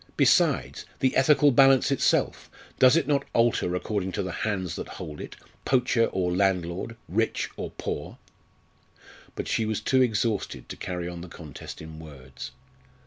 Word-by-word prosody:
Besides - - +3 0.2
the 130 - +1
ethical 145 +1 +5
balance 135 +1 +5
itself 135 - +1 0.3
does 130 +2 +7
it 165 - +1
not 140 -2 +2
alter 115 -6 +2
according 95 0 -2
to 100 - -1
the 95 - -4
hands 95 -2 -2
that - - -5
hold 75 -1 -7
it - - -8 0.3
poacher 125 -3 +2
or 90 -4 -1
landlord, 95 +2 0
rich 110 +6 -1
or - - -5
poor? - - -5 1.2
But - - -4
she 115 - +1
was 110 -1 -1
too 130 -1 +2
exhausted 110 -3 -1
to - - -6
carry 90 -2 -4
on 85 -1 -6
the 90 - -8
contest 80 -1 -9
in 80 0 -10
words. 65 -5 -10
100 Hz, 155 wpm, -26 LUFS, 90-125 Hz, 1.2 s, does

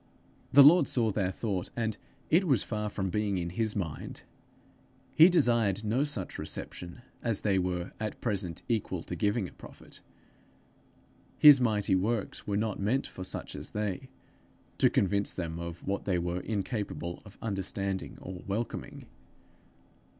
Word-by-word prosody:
The 140 +1 +9
Lord 155 +1 +7
saw 115 -3 +1
their 95 -2 0
thought, 95 -3 -3
and 110 -3 -1 0.4
it 180 +4 +5
was 130 -9 +3
far 105 -1 -3
from 95 -2 -2
being 105 0 0
to 85 -1 -3
his 110 +1 0
mind. 85 -7 -4 0.9
He 165 +3 +8
desired 115 - +3
no 120 +6 +2
such 120 -11 -4
reception 90 +7 -6 0.2
as 115 -4 -1
they 100 -3 +2
were 90 0 -2
at 110 -1 -4
present 100 -7 -3
equal 105 -7 -1
to - - -5
giving 105 -2 0
a - - -12
prophet. - - -10 1.4
His 145 -3 +9
mighty 105 -5 +2
works 105 +3 -1
were 100 -1 0
not 105 -1 -1
meant 115 +8 +1
for 95 - -7
such 95 - -4
as - - -6
they 105 +4 -3 0.7
to - - +6
convince 100 +1 +1
them 85 -2 -4
of 85 0 -7
what 100 0 -1
they 95 -2 +1
were 90 +1 -1
incapable 100 -4 -3
of 105 -1 -15
understanding 95 -2 -3
or 90 -1 -7
welcoming! 110 +4 -4
100 Hz, 150 wpm, -30 LUFS, 95-115 Hz, 1.4 s, The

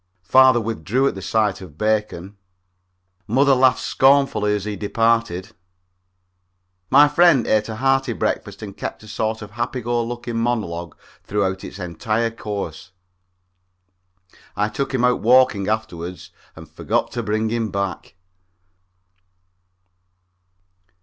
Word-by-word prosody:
Father 130 +5 +5
withdrew 115 - -1
at - - 0
the 95 - -8
sight 105 0 0
of 80 -6 -12
bacon. 105 -3 -1 0.9
Mother 135 +5 +3
laughed 130 0 +3
scornfully 135 -6 +3
as 100 -1 -4
he 105 -1 -3
departed. 115 -2 0 1.4
My 145 +2 +7
friend 150 -4 +4
ate 110 0 +1
a 110 - -4
hearty 135 +3 +1
breakfast - - -3
and 100 -2 -8
kept - - -6
a - - -13
sort 110 +1 -3
of 105 - -11
a - - -21
happy 120 +2 -3
go 120 0 -1
lucky 120 0 -5
monologue 105 -9 -2 0.3
throughout 95 -2 -2
its - - -8
entire 110 +6 -2
course. 100 -8 -6 1.7
I 105 +1 0
took 135 +7 -3
him 130 -2 -1
out 125 0 +1
walking 120 -4 +4
afterward 90 -5 -3 0.4
and - - -12
forgot - - -2
to - - -3
bring 110 +2 -1
him 115 -1 -1
back. 100 0 -4
110 Hz, 130 wpm, -21 LUFS, 100-120 Hz, 1.7 s, My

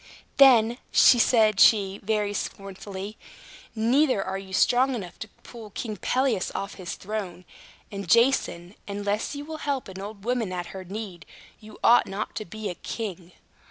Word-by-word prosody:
"Then," 240 -3 +6
said 220 -4 +5
she, 200 -3 +5
very 210 0 -1
scornfully, 195 +1 -6 0.6
"neither 245 +1 +2
are 190 +1 -4
you 195 -1 -11
strong 250 +6 +3
enough 180 -6 -8
to 220 - -6 0.2
pull 230 -3 -11
King 215 +2 -5
Pelias 250 0 0
off 200 +1 -4
his 175 - -5
throne. 190 -3 -6 0.5
And, 200 -3 -6
Jason, 230 -6 +2
unless 205 +5 -2
you 285 +1 -6
will 315 0 -6
help 280 -4 -3
an 190 0 -9
old 205 0 -9
woman 240 -5 -1
at 175 -1 -5
her 190 -1 -7
need, 190 -3 -8 0.3
you 215 0 -13
ought 240 - +5
not 195 +2 -5
to 215 - -4
be 215 +3 -6
a 185 - -3
king. 185 -3 -7
210 Hz, 160 wpm, -25 LUFS, 195-235 Hz, 0.6 s, Then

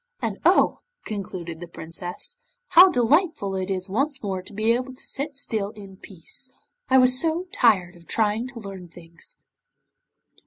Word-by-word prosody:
And - - -3
oh!' - - +4 0.3
concluded 185 -5 -5
the 175 - -8
Princess, 175 - -5 0.3
'how 360 +2 +9
delightful 285 - +2
it 190 0 -3
is 185 0 -2
once 275 +7 -1
more 190 -2 -2
to 185 - -13
be 215 +2 +1
able 255 +2 -3
to - - -10
sit 280 +1 0
still 220 -7 -1
in 200 -2 -11
peace. 195 - -3 0.4
I 265 - +6
was 255 0 +5
so 330 +2 0
tired 190 -7 +3
of 170 -1 -18
trying 220 +2 0
to 250 -2 -9
learn 195 -4 -8
things. 170 0 -9
210 Hz, 160 wpm, -24 LUFS, 185-260 Hz, 0.4 s, how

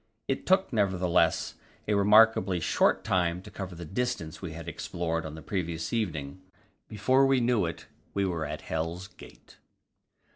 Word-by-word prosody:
It 135 - -2
took, 190 -5 +3
nevertheless, 95 -5 +2 0.3
a 105 - +2
remarkably 105 -2 +5
short 80 - +2
time 90 0 0
to 105 - -12
cover 95 -3 -6
the 85 +1 -8
distance 95 -4 -3
we 90 -4 -6
had 85 0 -8
explored 85 0 -3
on 75 - -8
the 80 - -10
previous 85 -3 -3
evening; 85 -7 -3 0.5
before 130 +6 +3
we 135 -1 +3
knew 120 -6 +2
it, 80 - -7 0.3
we 100 0 +1
were 85 -5 -2
at 75 +1 -5
Hell's 80 +3 -3
Gate. - - -16
90 Hz, 155 wpm, -28 LUFS, 80-105 Hz, 0.5 s, remarkably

